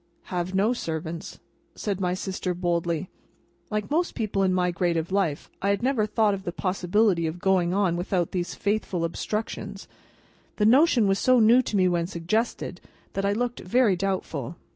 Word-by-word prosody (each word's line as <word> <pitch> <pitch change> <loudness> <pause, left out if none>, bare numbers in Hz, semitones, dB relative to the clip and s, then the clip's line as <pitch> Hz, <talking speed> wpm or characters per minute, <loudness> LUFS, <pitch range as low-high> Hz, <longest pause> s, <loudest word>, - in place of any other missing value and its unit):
"Have 180 +1 -2
no 210 +5 +3
servants," 160 -6 -5 0.4
said 200 -4 -3
my 180 -1 0
sister, 185 -1 -3
boldly. 170 -1 -1 0.6
Like 210 +3 -3
most 340 +4 0
people 210 -3 -1
in 190 -1 +3
my 180 -1 +1
grade 170 0 0
of 165 +2 -3
life, 185 -7 0
I 200 - +1
had 200 +3 0
never 250 -5 +2
thought 215 -1 +2
of 195 - -4
the 175 - -3
possibility 185 -1 +1
of 160 +2 -4
going 180 -1 +2
on 190 -2 +2
without 175 -1 -1
those 180 -2 -3
faithful 200 -4 -1
obstructions. 200 +2 -4 0.7
The 210 - +1
notion 250 -1 +5
was 195 0 +2
so 255 -1 +4
new 230 +3 +6
to 220 -4 -2
me 185 -1 +4
when 170 -1 0
suggested, 195 +6 -2 0.3
that 195 - -1
I 200 - +2
looked 240 +2 -2
very 220 +1 +3
doubtful. 175 -6 -3
190 Hz, 175 wpm, -26 LUFS, 175-215 Hz, 0.7 s, new